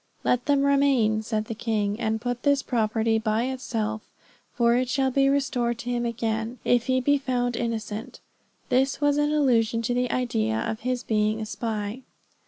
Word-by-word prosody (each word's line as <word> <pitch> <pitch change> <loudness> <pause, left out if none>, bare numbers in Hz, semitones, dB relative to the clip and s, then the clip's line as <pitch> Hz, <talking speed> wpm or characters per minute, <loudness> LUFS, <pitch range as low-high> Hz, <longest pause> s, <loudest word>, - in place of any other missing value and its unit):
'Let 245 +2 +1
them 285 -1 +3
remain,' 275 -6 +3
said 215 -1 -2
the 225 - -5
king, 215 -2 -1
'and 220 -1 -1
put 245 +1 -3
this 285 -1 +2
property 225 -1 +1
by 220 +1 0
itself, 225 -4 -3 0.4
for 235 -1 +2
it 250 0 0
shall 265 0 +1
be 275 +1 +3
restored 250 -4 0
to 235 +1 -5
him 240 -1 0
again, 230 0 -2
if 240 -1 +2
he 260 0 +2
be 285 +2 +2
found 245 -2 -1
innocent.' 225 -2 -4 0.5
This 265 +2 +2
was 290 0 +2
in 295 0 +2
allusion 235 -6 +2
to 245 - 0
the 250 0 0
idea 110 - 0
of 220 - -2
his 250 0 -2
being 215 0 +1
a 220 - -3
spy." 215 +1 -4
235 Hz, 180 wpm, -25 LUFS, 220-255 Hz, 0.5 s, them